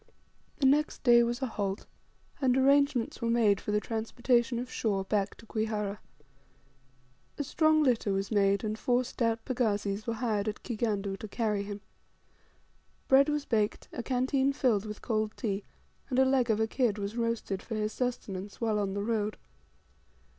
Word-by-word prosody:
The 275 - 0
next 295 +3 +2
day 240 -2 +7
was 240 +2 -1
a - - +2
halt, 200 -4 -3 0.6
and 260 -1 +3
arrangements 275 -3 +3
were 230 - 0
made 220 -4 +3
for - - -7
the 210 - +2
transportation 235 +2 0
of 250 +1 -5
Shaw 200 -4 0
back 200 0 -1
to 230 - -16
Kwihara. 215 -2 -2 1.4
A 290 - -1
strong 310 +2 +3
litter 240 -6 +2
was 195 +1 -2
made, 200 -1 +2
and 215 0 -3
four 245 +2 +2
stout 230 -2 -1
pagazis 210 -4 -1
were 230 - -1
hired 220 -3 -1
at 210 - -4
Kigandu 210 -4 -2
to 215 - -6
carry 210 -1 -1
him. 200 0 -6 1.3
Bread 275 +2 +6
was 295 -1 -1
baked, 215 -3 -1
a - - -3
canteen 265 +2 +1
was 275 - 0
filled 220 -6 +2
with 210 0 -8
cold 215 -2 -1
tea, 200 -2 -2 0.4
and 255 - -1
a 265 - +6
leg 260 -2 +2
of 220 -1 +2
a 220 - +3
kid 220 -2 0
was 200 +1 -4
roasted 230 -5 -2
for 225 - -6
his 215 0 -1
sustenance 205 -6 -4
while 220 -2 +1
on 195 -1 -2
the 200 - -2
road. 215 -1 -1
225 Hz, 175 wpm, -30 LUFS, 205-250 Hz, 1.4 s, day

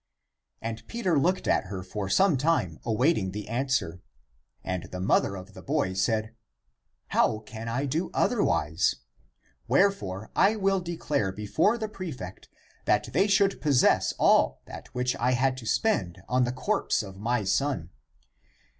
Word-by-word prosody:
And 115 0 -4
Peter 190 -10 0
looked 180 +6 +1
at - - +2
her 95 -1 -6
for 95 +1 -5
some 190 - +4
time 125 - 0
awaiting 115 - +1
the 105 0 -6
answer. 120 -8 -1 0.6
And 90 -2 -3
the 90 - -7
mother 95 +1 +2
of 95 +2 -10
the - - -11
boy 140 -10 0
said, 110 +3 0 0.4
*' - - -54 0.3
How 110 - +2
can 110 +1 -9
I 130 +5 -1
do 155 +6 -1
otherwise? 85 - +1 0.7
Wherefore 110 - +1
I 200 +3 +4
will 195 -2 +1
declare 160 - -2
before 105 - +1
the 220 -2 -3
prefect 155 - -8 0.4
that - - +1
they 195 - +3
should 200 -1 +2
possess 140 -5 +3
all - - +3
that - - -10
which 125 0 0
I 125 +2 +1
had 130 +1 +2
to 115 -4 -8
spend 95 - 0
on 125 0 +2
the 120 - -1
corpse 130 - 0
of 95 -2 -10
my 120 +1 0
son." 95 - -1
125 Hz, 155 wpm, -27 LUFS, -, 0.7 s, some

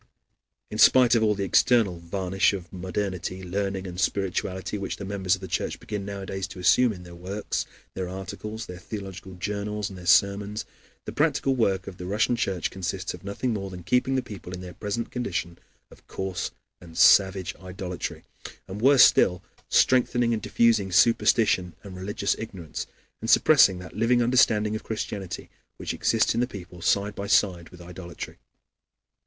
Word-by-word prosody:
In 105 - -5
spite 125 +1 +7
of 115 - +4
all 105 -1 +3
the 100 - -2
external 100 -2 +3
varnish 95 +3 0
of 90 -2 -7
modernity, 95 0 -4
learning, 95 +1 -2
and 90 -1 -6
spirituality 95 0 -1
which 100 - -3
the 100 - -6
members 95 -2 0
of 95 - -14
the 95 - -6
Church - - -2
begin 105 -2 -5
nowadays 95 -1 -5
to 95 - -10
assume 120 +6 +4
in 90 -4 -9
their 90 -1 -12
works, 95 +4 -4 0.3
their 95 -1 -4
articles, 105 +4 -6
their 90 0 -9
theological 95 -3 -8
journals, 105 +2 -3
and 95 - -10
their 90 - -9
sermons, 100 +4 +3 0.4
the - - -5
practical 140 -3 +1
work 95 -6 +1
of 90 - -9
the 90 - -7
Russian 105 +5 +1
Church 95 -7 -1
consists 95 0 -4
of 90 - -11
nothing 100 +5 -2
more 100 -2 -4
than 90 -2 -9
keeping 125 +7 +1
the 130 - 0
people 90 -3 -9
in 90 - -6
their 90 -1 -8
present 105 +3 -4
condition 90 -8 -3 0.3
of - - -18
coarse 95 -1 -3 0.3
and 85 -2 -13
savage 95 0 +5
idolatry, 90 -1 -6 0.4
and 100 +3 -7
worse 135 +1 +7
still, 90 0 +4 0.3
strengthening 120 -2 +3
and 110 - -2
diffusing 105 -2 +2
superstition 95 -3 +3
and 100 -2 -9
religious 100 +2 -1
ignorance, 95 -8 -6 0.3
and 115 - -3
suppressing 125 -10 +6
that 90 +1 -10
living 120 +3 +3
understanding 110 -3 +3
of 110 - -4
Christianity 105 -4 -5 0.3
which - - -4
exists 115 -1 +2
in - - -1
the 125 - +1
people 90 -6 -10
side 100 +4 +1
by 100 0 -5
side 90 -5 +2
with 90 -1 -14
idolatry. 85 0 -9
95 Hz, 170 wpm, -26 LUFS, 90-105 Hz, 0.4 s, spite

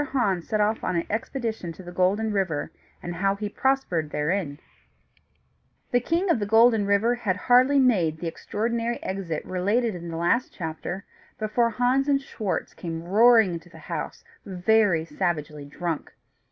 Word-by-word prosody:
HANS 195 -10 0
SET 215 - 0
OFF 210 +1 +1
ON 185 - -1
AN 170 - 0
EXPEDITION 220 -5 -3
TO 185 - -12
THE 175 - -9
GOLDEN 195 +5 +1
RIVER, 185 -7 -1 0.3
AND 175 - -4
HOW 195 +2 +1
HE 205 0 -4
PROSPERED 230 - 0
THEREIN 150 0 -2 1.3
The 245 - +4
King 340 +8 0
of 250 - +2
the 205 - -2
Golden 225 -1 +5
River 200 +4 +3
had 225 -6 -1
hardly 255 +6 +4
made 195 - +3
the 170 - -7
extraordinary 230 +7 -2
exit 185 -5 -4
related 205 +6 0
in 170 -1 -7
the 165 - -5
last 200 +10 +1
chapter, 175 +3 -5 0.3
before 225 +2 +1
Hans 250 +4 +1
and 280 -1 +3
Schwartz 220 -8 -4
came 165 -1 -6
roaring 220 +1 +5
into 170 +1 -8
the - - -14
house, - - -6 0.2
very 190 -3 +2
savagely 150 -5 -3
drunk. 165 +2 -4
200 Hz, 160 wpm, -25 LUFS, 175-235 Hz, 1.3 s, Golden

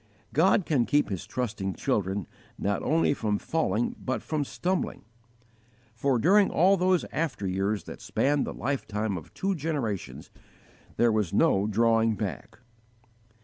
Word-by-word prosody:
God 185 +4 +4
can 130 -7 +1
keep 145 0 +2
His 95 -4 -4
trusting 105 -6 -3
children 100 - -1 0.3
not 100 0 -1
only 160 -1 +2
from 105 -6 -1
falling 120 -7 -1
but 130 - -2
from 155 -2 -1
stumbling; 180 +6 -2 0.9
for, 125 +3 +1
during 195 - +4
all 190 +4 +4
those 185 -1 +2
after 155 -10 -2
years 95 +3 -1
that - - -10
spanned 145 +1 +1
the - - -3
lifetime 110 -6 -2
of 80 -4 -8
two 195 +1 0
generations, 145 - -4 0.7
there 120 -1 +4
was 105 -5 0
no 100 +2 +3
drawing 115 +1 +3
back. 105 +2 -5
120 Hz, 140 wpm, -27 LUFS, 105-155 Hz, 0.9 s, God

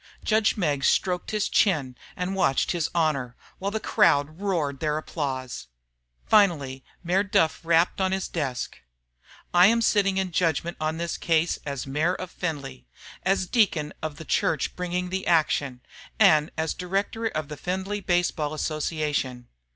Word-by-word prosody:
Judge 220 0 +2
Meggs 145 -8 +1
stroked 180 -1 +1
his 215 -1 0
chin 145 - +2 0.2
and 180 +1 -2
watched 135 -8 +2
His 170 -4 -1
Honor, 140 -7 0 0.2
while 195 - -1
the 220 +2 -2
crowd 150 -4 +2
roared 160 -9 -1
their 150 -1 0
applause. 130 - -4 0.6
Finally 150 -11 +3 0.2
Mayor 180 +3 +2
Duff 195 -5 +1
rapped 170 +3 +2
on 190 0 +1
his 190 0 -1
desk. 135 -7 -4 0.7
"I 180 +1 +7
am 230 +2 +3
sitting 200 -4 +2
in 190 -1 -1
judgment 170 0 0
on 155 +1 -1
this 170 0 -3
case 165 0 +1
as 140 -2 -3
Mayor 155 +7 0
of 185 -1 -7
Findlay, 140 - -5 0.3
as 190 +1 +1
a - - -8
deacon 170 -10 +2
of 155 -2 -4
the 160 - -10
church 155 -5 0
bringing 180 0 -3
the 190 0 -3
action, 145 -6 +1 0.4
and 155 -7 +5
as 160 0 -1
a - - -22
director 195 +5 -1
of 155 -8 -3
the 150 - -7
Findlay 190 +5 -3
Baseball 175 -5 0
Association. 150 -5 -2
165 Hz, 160 wpm, -25 LUFS, 150-190 Hz, 0.7 s, I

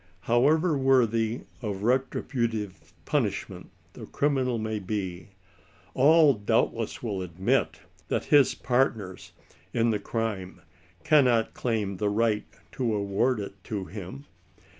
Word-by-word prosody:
However 150 +8 +3
worthy 120 -4 +2 0.2
of 100 -4 -4
retributive 115 -4 -1
punishment - - -2 0.2
the - - -10
cri 145 - +1
minal 130 -4 0
may 110 0 -3
be, 95 -2 -4 0.6
all 155 +1 +6
doubtless 105 +2 -1
will 100 -5 -3
admit 90 +1 -1 0.3
that - - -1
his 145 -3 +6
partners 115 -7 -1 0.4
in 115 0 +2
the 105 - -1
crime 100 -4 -4 0.4
cannot 125 -7 +3
claim 105 -5 -2
the 105 +2 0
right 105 0 +1 0.3
to 120 -4 -1
award 105 +4 0
it 100 -1 -8
to 100 -4 -4
him. 90 -9 -9
110 Hz, 120 wpm, -27 LUFS, 100-125 Hz, 0.6 s, all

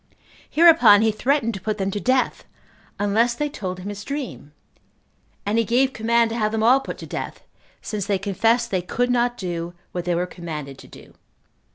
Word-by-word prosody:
Hereupon 275 -11 +6
he 220 - +3
threatened 235 +1 0
to 195 - -7
put 215 +2 -2
them 195 -1 -1
to 205 - -3
death, 255 +3 0 0.5
unless 220 +4 +1
they 295 +3 -2
told 185 -10 -5
him 185 +2 -7
his 205 0 -7
dream; 270 - -6 0.9
and 210 +3 +1
he - - +3
gave 255 +4 +2
command 230 +1 +2
to 230 - -3
have 215 -2 0
them 220 0 -1
all 250 +4 +6
put - - -7
to - - -9
death, - - -6 0.4
since 205 -3 -4
they 200 -2 +1
confessed 225 +5 +1
they 185 -2 0
could 245 +7 -1
not 245 0 +1
do 175 -3 -5 0.2
what 175 -1 -4
they 175 -1 0
were 175 +1 0
commanded 155 -7 -7
to - - -13
do. - - -15
215 Hz, 195 wpm, -22 LUFS, 190-240 Hz, 0.9 s, Hereupon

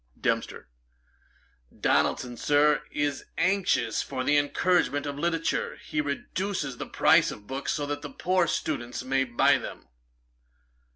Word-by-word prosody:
DEMPSTER. - - -2 1.1
'Donaldson, 125 -1 +1
Sir, 145 +3 +3
is 145 -1 -2
anxious 180 - +1
for 130 -2 -4
the 145 +3 +3
encouragement 145 -1 +2
of 145 0 -4
literature. 165 0 -1
He 150 - -2
reduces 150 0 -3
the - - -5
price - - +4
of 105 - -9
books, 135 +4 -3
so 145 - -2
that 145 0 -4 0.2
poor 185 -1 +2
students 125 -6 -3
may 135 +1 +1
buy 120 -2 +3
them.' - - -9
145 Hz, 125 wpm, -27 LUFS, 135-165 Hz, 1.1 s, price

